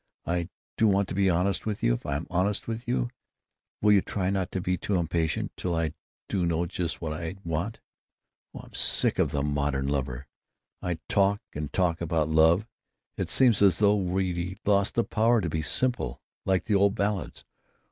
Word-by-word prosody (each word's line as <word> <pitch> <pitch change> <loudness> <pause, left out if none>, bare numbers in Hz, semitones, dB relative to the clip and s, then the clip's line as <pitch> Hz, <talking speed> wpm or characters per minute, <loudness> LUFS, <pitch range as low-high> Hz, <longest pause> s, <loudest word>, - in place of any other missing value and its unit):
I 85 0 -1 0.3
do 110 - +4
want 100 -1 +2
to - - -3
be 95 +1 +2
honest 90 +4 0
with 105 -2 -3
you. - - +4
If - - -5
I'm 70 +3 -2
honest, 95 +3 0
will 115 -1 -2
you 95 - -1
try 95 -1 -2
not 95 -2 -1
to 95 - -2
be 90 0 0
too 100 +2 -2
impatient 85 -2 -1
till 90 -2 -2
I 80 -1 -1 0.3
do 95 - -1
know 85 0 +1
just 85 -2 -3
what 80 -2 -3
I 80 +3 -5
want?... 85 +7 -2 0.8
Oh, - - -7
I'm - - -16
sick - - +2
of - - +3
the 70 -1 -1
modern 70 -2 -1
lover! 70 -2 -2 0.6
I 90 -2 -2
talk 100 0 +2
and 75 -1 -5
talk 85 -3 0
about 80 -2 0
love; 80 +5 +4 0.5
it - - -3
seems 120 -6 +5
as 95 -5 +5
though 105 0 +4
we'd 90 -1 -1
lost 100 0 +2
the 115 - +3
power 115 +2 +2
to 90 -5 -2
be 80 - -1
simple, 80 - 0 0.3
like 95 -1 +2
the 110 - 0
old 100 +1 +3
ballads. 100 -3 -2
90 Hz, 185 wpm, -27 LUFS, 80-100 Hz, 0.8 s, seems